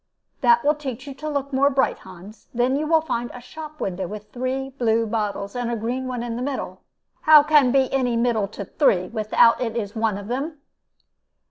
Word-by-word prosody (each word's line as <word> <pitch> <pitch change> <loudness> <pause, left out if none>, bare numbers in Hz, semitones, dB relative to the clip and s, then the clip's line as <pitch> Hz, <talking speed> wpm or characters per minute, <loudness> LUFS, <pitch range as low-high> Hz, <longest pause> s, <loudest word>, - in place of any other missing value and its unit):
"That 235 -1 +4
will 295 - +5
teach 270 -4 -6
you 280 - -7
to 300 +3 -6
look 280 -1 -3
more 275 +2 +4
bright, 270 -1 +1
Hans. 190 +3 -13
Then 245 +2 +2
you 300 +2 -2
find 240 -6 -3
a - - -8
shop 305 +4 -10
window 190 -1 -3
with 210 +2 -9
three 260 +2 -3
blue 230 -4 +1
bottles, 210 -1 -3
and 245 -1 -2
a 235 - -1
green 245 +4 -3
one 250 -2 -3
in 235 -1 -4
the - - -4
middle." 275 +1 -4 0.4
"How 310 -2 +8
can 295 -4 +4
be 265 0 +3
any 250 -3 +1
middle 230 -4 +1
to 200 0 -7
three, 185 - +1
without 220 +1 +3
it 235 -2 -2
is 205 -2 -4
one 220 -2 0
of 200 0 -8
them?" 280 +7 -3
245 Hz, 205 wpm, -23 LUFS, 220-275 Hz, 0.4 s, How